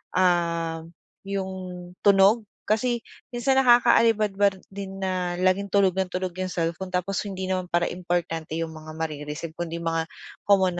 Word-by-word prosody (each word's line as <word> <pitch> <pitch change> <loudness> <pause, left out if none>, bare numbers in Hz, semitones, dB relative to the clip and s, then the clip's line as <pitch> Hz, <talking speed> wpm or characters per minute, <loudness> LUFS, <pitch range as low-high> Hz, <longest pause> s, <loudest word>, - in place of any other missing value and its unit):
ah, 170 -3 +1 0.4
yung 195 -1 -2 0.5
tunog 200 +2 +5 0.2
kasi 235 +2 0 0.3
minsan 265 +2 +3
nakakaalibadbad 215 -6 +4
din 195 0 -6
na 180 -2 -1
laging 185 +2 +2
tunog 195 -1 +4
nang 190 0 0
tunog 185 0 -2
yung 185 - -1
cellphone 170 +1 -2
tapos 185 +2 -1
hindi 190 -1 -4
naman 185 -1 -1
para 175 0 +1
importante 170 -3 -2
yung 165 0 -2
mga 155 0 -10
mare-receive, 155 0 -4
kundi 170 -1 -3
mga 165 0 0 0.4
common 190 -3 +4
185 Hz, 140 wpm, -25 LUFS, 170-200 Hz, 0.5 s, tunog